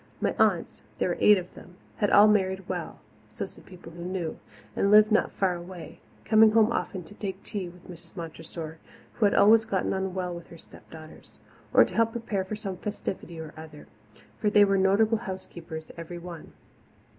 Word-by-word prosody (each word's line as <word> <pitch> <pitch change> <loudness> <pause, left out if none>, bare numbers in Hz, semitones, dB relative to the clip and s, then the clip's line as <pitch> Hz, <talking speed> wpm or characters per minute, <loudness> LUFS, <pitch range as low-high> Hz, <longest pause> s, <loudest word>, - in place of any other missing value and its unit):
My - - 0
aunts - - +1 0.2
there - - 0
were - - -1
eight 210 -1 +7
of 180 -1 -7
them 180 - -14 0.2
had 205 - +1
all 205 +1 +7
married 190 -3 +1
well, - - -5 0.3
so - - -5
said - - -16
people 180 -3 -12
who 170 +1 -9
knew, 180 -3 -4 0.4
and 200 - +1
lived 215 +1 +7
not 215 - +2
far 190 -2 0
away, 175 0 -9 0.3
coming 220 0 +6
home 225 0 +4
often 190 -5 -3
to 165 - -14
take 195 -2 -6
tea 190 -4 -5
with 175 0 -17
Mrs. 170 -1 -13
Montressor, 160 -1 -7 0.3
who 220 - +1
had 200 - +3
always 220 +2 +6
gotten 200 -4 -1
on 190 -1 -3
well 180 -1 -2
with 170 -1 -9
her 170 - -13
step - - -17
daughters, 155 -1 -13 0.3
or - - +7
to - - -9
help 225 0 +2
prepare 225 -5 -2
for 190 +3 -5
some 200 -3 -5
festivity 185 -4 -5
or 160 -1 -8
other 155 -1 -11 0.5
for 210 - +2
they 205 0 +6
were 195 0 +2
notable 215 +4 +3
housekeepers, 170 -6 -8
every 170 +1 -7
one. 170 -2 -10
190 Hz, 195 wpm, -27 LUFS, 170-210 Hz, 0.5 s, eight